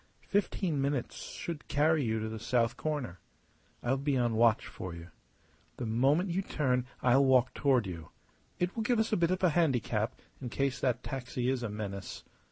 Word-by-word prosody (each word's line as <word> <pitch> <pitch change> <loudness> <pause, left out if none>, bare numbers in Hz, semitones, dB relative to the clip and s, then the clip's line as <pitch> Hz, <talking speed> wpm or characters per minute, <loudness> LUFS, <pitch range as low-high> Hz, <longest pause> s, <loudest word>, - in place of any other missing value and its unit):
Fifteen 190 -6 0
minutes 140 -2 -1
should 165 -3 -6
carry 155 +1 +3
you 110 -2 0
to 110 - -3
the 110 0 -5
south 115 +1 +1
corner. 145 - -3 0.6
I'll 130 +3 +1
be 140 -1 +1
on 120 -2 +1
watch 115 0 +4
for 90 -2 -7
you. 85 +1 -10 0.7
The - - -3
moment 135 - +2
you 185 +3 0
turn 125 -8 0 0.2
I'll 130 +2 +5
walk 130 -2 +4
toward 130 -6 +2
you. 85 -4 -7 0.5
It 180 +1 -1
will 225 - -1
give 240 +2 +2
us 220 0 +1
a - - +5
bit 170 -3 +2
of 185 +1 -1
a 180 - +5
handicap 125 -9 +1 0.3
in 125 - -4
case 135 +1 -1
that 125 -2 0
taxi 125 -1 -2
is 130 -2 -1
a 115 - -2
menace. 100 -2 -6
130 Hz, 185 wpm, -31 LUFS, 115-150 Hz, 0.7 s, I'll